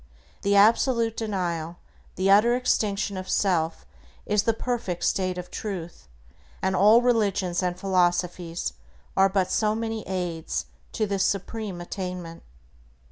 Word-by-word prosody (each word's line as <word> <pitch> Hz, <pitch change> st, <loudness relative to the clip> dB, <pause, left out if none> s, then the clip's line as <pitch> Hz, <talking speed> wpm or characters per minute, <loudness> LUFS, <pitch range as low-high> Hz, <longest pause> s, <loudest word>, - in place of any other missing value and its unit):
The 200 Hz, 0 st, +2 dB
absolute 230 Hz, +2 st, +4 dB
denial, 175 Hz, -6 st, -3 dB, 0.4 s
the 190 Hz, +2 st, +2 dB
utter 225 Hz, +4 st, +5 dB
extinction, 210 Hz, -5 st, 0 dB
of 185 Hz, 0 st, -6 dB
self 170 Hz, -5 st, 0 dB, 0.4 s
is 210 Hz, -1 st, +2 dB
the 230 Hz, -, +1 dB
perfect 230 Hz, -8 st, -3 dB
state 185 Hz, -1 st, 0 dB
of 180 Hz, 0 st, -7 dB
Truth, 175 Hz, -, -6 dB, 0.5 s
and 190 Hz, 0 st, 0 dB
all 215 Hz, +6 st, +6 dB
religions 200 Hz, -7 st, +1 dB
and 180 Hz, -1 st, -2 dB
philosophies 175 Hz, -, 0 dB, 0.4 s
are 195 Hz, 0 st, +5 dB
but 190 Hz, -2 st, 0 dB
so 215 Hz, -1 st, +1 dB
many 225 Hz, -1 st, -3 dB
aids 175 Hz, -3 st, -3 dB, 0.3 s
to 215 Hz, -, 0 dB
this 200 Hz, -2 st, 0 dB
supreme 200 Hz, -1 st, -2 dB
attainment. 180 Hz, -2 st, -6 dB
195 Hz, 130 wpm, -25 LUFS, 180-215 Hz, 0.5 s, all